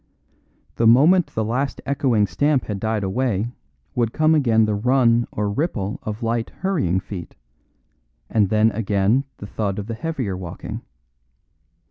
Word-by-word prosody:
The 115 - +3
moment 155 +10 +6
the 110 - -2
last 130 +5 -1
echoing 130 -6 +2
stamp 135 - +1
had 105 -2 -4
died 110 0 -1
away 115 +1 -1 0.4
would 115 -2 0
come 155 0 +3
again 115 -7 +3
the 110 - 0
run 120 +1 +3
or 105 0 -2
ripple 105 - -2
of 110 +2 -5
light, 115 0 -1
hurrying 150 - +1
feet, 95 -2 -8 0.9
and 105 - +2
then 110 +1 +3
again 105 +4 +1
the - - -8
thud 100 -1 -3
of 100 - -4
the 115 - -5
heavier 125 - -3
walking. 90 -2 -7
115 Hz, 145 wpm, -22 LUFS, 105-130 Hz, 0.9 s, moment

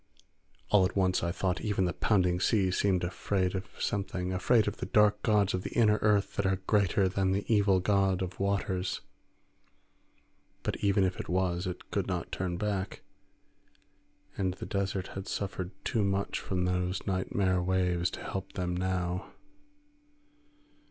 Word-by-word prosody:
All 105 -2 +5
at 90 - 0
once 95 -2 +2
I 85 - 0
thought 95 0 -1
even 105 -3 0
the 90 - -1
pounding 90 -4 +2
sea 95 -1 +2
seemed 95 -1 +1
afraid 90 +1 -1
of 95 0 -4
something, 95 -2 -2
afraid 105 +4 +3
of 105 - -2
dark 105 -1 +4
gods 105 -3 +2
of 90 - -1
the - - -5
inner 105 -2 +4
earth 105 -2 +2
that 100 - +1
are 95 - +2
greater 100 -2 +3
than 95 0 +1
the 100 +1 -1
evil 100 -4 +4
god 95 -1 +2
of 90 0 -6
waters, 95 -2 -1 1.6
but - - -1
even 100 -1 +2
if 95 -1 -1
it - - -6
was 90 0 0
it 90 -1 -7
could 100 -3 -1
not 90 -3 -3
turn 90 -1 -2
back; 100 -1 -3 1.3
and 95 -2 -1
the - - -7
desert 95 -1 -2
had 95 0 -7
suffered 95 -2 -3 0.2
too 110 - +1
much 100 0 0
from 90 -1 -1
those 90 +1 -1
nightmare 95 -1 0
waves 90 -1 +1
to - - -8
help 95 0 -5
them 90 -1 -2
now. 90 0 -2
95 Hz, 160 wpm, -30 LUFS, 90-100 Hz, 1.6 s, All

